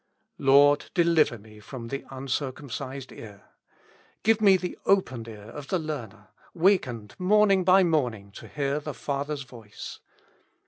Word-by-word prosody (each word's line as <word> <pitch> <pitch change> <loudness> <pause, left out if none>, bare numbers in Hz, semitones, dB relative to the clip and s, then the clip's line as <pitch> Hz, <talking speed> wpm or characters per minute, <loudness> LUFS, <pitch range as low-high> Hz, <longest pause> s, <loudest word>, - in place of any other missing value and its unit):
Lord! 140 +2 +5
deliver 170 -8 +3
me 110 0 -16
from 115 +2 -8
the 140 +2 -5
uncircumcised 135 0 -5
ear. 105 -3 -12 0.7
Give 220 0 +3
me 195 -3 +6
the 180 -1 -5
opened 130 -13 +1
ear 110 0 -10
of 145 0 -9
the 185 - 0
learner, 120 - -6 0.3
wakened 135 - +1
morning 195 0 +4
by 185 +1 +6
morning 125 - 0
to - - -11
hear 140 0 -2
the 150 -1 -7
Father's 140 0 -3
voice. 115 -5 -10
140 Hz, 135 wpm, -26 LUFS, 115-170 Hz, 0.7 s, me